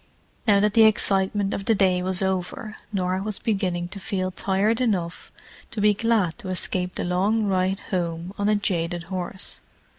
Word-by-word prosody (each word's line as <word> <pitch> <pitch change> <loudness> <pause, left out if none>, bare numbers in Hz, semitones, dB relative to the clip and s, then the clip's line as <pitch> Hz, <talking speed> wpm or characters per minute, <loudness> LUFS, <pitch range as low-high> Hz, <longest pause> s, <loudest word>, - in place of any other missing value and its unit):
Now 205 -2 +6
that 210 0 +2
the 225 0 +7
excitement 200 -1 +2
of 195 - -4
the 225 - +3
day 185 -2 +3
was 185 +1 0
over, 190 +3 -3
Norah 185 -2 -1
was 210 0 -3
beginning 185 -5 -1
to 200 - -7
feel 185 -1 -2
tired 200 +5 +1
enough 180 -8 -1 0.4
to 225 - -6
be 210 0 +5
glad 215 -4 +1
to 200 -5 -7
escape 180 0 -1
the - - -2
long 195 +5 +1
ride 190 0 0
home 170 0 -2
on 205 +1 +2
a 215 - +4
jaded 175 -4 -1
horse. 185 +1 -2
190 Hz, 175 wpm, -24 LUFS, 180-210 Hz, 0.4 s, the